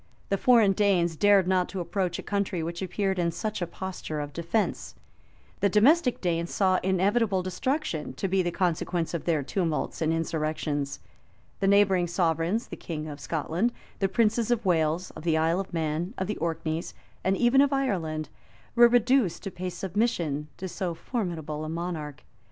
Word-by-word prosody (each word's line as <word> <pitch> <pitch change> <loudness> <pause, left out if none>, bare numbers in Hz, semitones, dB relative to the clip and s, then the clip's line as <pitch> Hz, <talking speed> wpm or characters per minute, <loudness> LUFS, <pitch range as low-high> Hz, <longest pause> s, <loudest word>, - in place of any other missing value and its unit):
[] - - -33
The 195 - +3
foreign 230 -5 +5
Danes 185 -4 +2
dared 200 +1 +4
not 185 -1 +2
to 195 - -5
approach 180 0 -1
a - - -6
country 200 -4 -1
which 170 +2 -4
appeared 190 0 -1
in 170 -1 +2
such 215 +3 -4
a 175 - -1
posture 185 -5 -5
of 145 -1 -5
defence: 170 +7 -2 0.6
the 200 - +3
domestic 250 - +4
Danes 170 -1 0
saw 185 -2 +2
inevitable 190 +1 +2
destruction 185 - -2
to 145 - -2
be 190 0 +2
the 175 - 0
consequence 175 -1 -1
of 170 - -3
their 160 -4 +1
tumults 165 +1 -2
and 160 0 +2
insurrections: 155 -3 -2 0.6
the 195 - +1
neighboring 195 -3 +4
sovereigns, 170 +5 0
the - - -6
king 155 -2 -5
of 145 -1 -7
Scotland, 165 - -1 0.3
the 195 - +1
princes 225 +1 +2
of 240 -3 +1
Wales, 165 0 +1
of - - -10
the 160 -1 +1
Isle 165 +3 +2
of 195 - -5
Man, 165 +5 -2
of 190 - -1
the 210 +2 -3
Orkneys, 165 0 -3 0.3
and 190 +1 +2
even 245 +3 +5
of 285 0 +3
Ireland,[] 170 - -1 0.5
were 240 0 +8
reduced 240 -4 +2
to 195 - -4
pay 180 +1 -4
submission 175 -7 -1
to 190 - -5
so 175 -1 -3
formidable 160 - -4
a 155 - -4
monarch. 165 -3 -5
180 Hz, 175 wpm, -27 LUFS, 165-200 Hz, 0.6 s, were